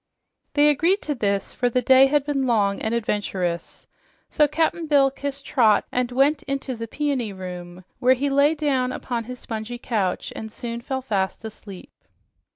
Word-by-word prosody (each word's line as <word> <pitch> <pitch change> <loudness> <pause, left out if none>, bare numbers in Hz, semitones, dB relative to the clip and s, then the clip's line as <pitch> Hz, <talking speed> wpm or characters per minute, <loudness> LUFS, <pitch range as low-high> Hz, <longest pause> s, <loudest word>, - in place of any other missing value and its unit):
They 295 0 +5
agreed 340 +8 +1
to 300 - -1
this, 200 -6 -1
for 245 - 0
the 250 +1 0
day 260 +2 +7
had 290 0 +1
been 275 -3 0
long 205 -4 +1
and 220 - -1
adventurous, 200 -6 -2 0.5
so 300 - +4
Cap'n 320 +2 0
Bill 280 -2 +4
kissed 280 0 -5
Trot 220 -6 +3
and 250 0 -1
went 275 +4 +2
in 275 0 0
to 265 -2 -6
the 230 0 -6
Peony 270 -4 -2
Room, 180 -1 -8
where 255 +1 +4
he 275 +3 -1
lay 285 +3 +4
down 270 -4 0
upon 240 -3 -4
his 250 +2 -7
spongy 225 +1 -6
couch 210 -7 -2
and 220 0 -7 0.3
fell 265 0 -3
fast 200 -2 -2
asleep. 205 -3 -10
250 Hz, 170 wpm, -23 LUFS, 215-280 Hz, 0.5 s, day